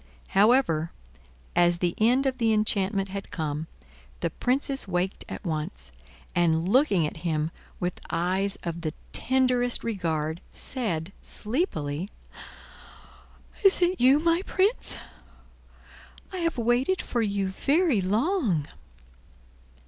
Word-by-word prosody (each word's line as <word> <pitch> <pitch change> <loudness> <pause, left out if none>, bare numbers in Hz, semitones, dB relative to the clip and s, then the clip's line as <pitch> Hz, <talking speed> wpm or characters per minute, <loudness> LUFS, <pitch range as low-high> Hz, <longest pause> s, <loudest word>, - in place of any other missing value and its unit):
However, 195 -6 +4 0.7
as 175 0 +4
the 175 -1 0
end 245 +5 +4
of 260 -1 0
the 225 -2 +3
enchantment 200 -2 +1
had 195 +1 -6
come, 155 -1 -3 0.5
the 170 - 0
Princess 270 - 0
waked 185 +1 -1
at - - -7
once, 150 - -4 0.4
and, 165 -1 +2
looking 205 - +4
at 150 - -4
him 160 -1 -1 0.3
with 180 0 -2
eyes 185 +4 0
of 170 -1 -4
the 155 -2 -2 0.2
tenderest 250 -1 +1
regard, 165 -7 -2
said, 195 - -3
sleepily: 195 - -2 1.5
"Is 390 -1 +6
it 360 -2 +1
you, 260 +3 +7
my 335 +3 +2
Prince? 395 +4 +1 1.4
I - - -3
have 330 -4 -1
waited 245 +10 +2
for 240 - -1
you 200 -3 0
very 280 - +2
long." 215 - +1
200 Hz, 115 wpm, -27 LUFS, 170-260 Hz, 1.5 s, you